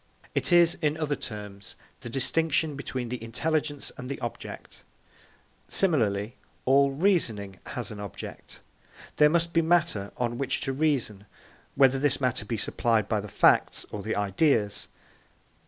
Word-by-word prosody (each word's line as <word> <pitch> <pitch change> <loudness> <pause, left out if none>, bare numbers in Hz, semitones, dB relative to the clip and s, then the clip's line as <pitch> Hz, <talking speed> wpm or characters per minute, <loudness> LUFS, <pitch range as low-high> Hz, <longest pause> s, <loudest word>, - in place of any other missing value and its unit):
It - - +2
is, 175 -1 +6
in 150 0 +1
other 150 -2 -1
terms, 105 -5 -8 0.2
the 120 - -7
distinction 155 +4 +1
between 130 -3 -4
the 125 -1 -5
intelligence 145 +4 -2
and 125 0 -6
the 140 - -4
object. 120 -2 -7 0.9
Similarly, 115 - +1 0.3
all 140 +1 +5
reasoning 135 - 0
has 120 -4 -5
an 105 - -8
object; 100 -1 -9 0.6
there 150 0 +6
must 170 +1 +1
be 165 - +4
matter 160 - +1
on 120 0 -2
which 135 - -1
to 135 - -2
reason, 130 -9 -1 0.5
whether 135 -1 +4
this 145 0 +1
matter 125 -5 -1
be 115 +2 -3
supplied 110 0 0
by 110 -1 0
the 105 - -6
facts - - +3
or 105 - -5
the 110 +2 -2
ideas. 105 - +1
130 Hz, 145 wpm, -27 LUFS, 105-150 Hz, 0.9 s, is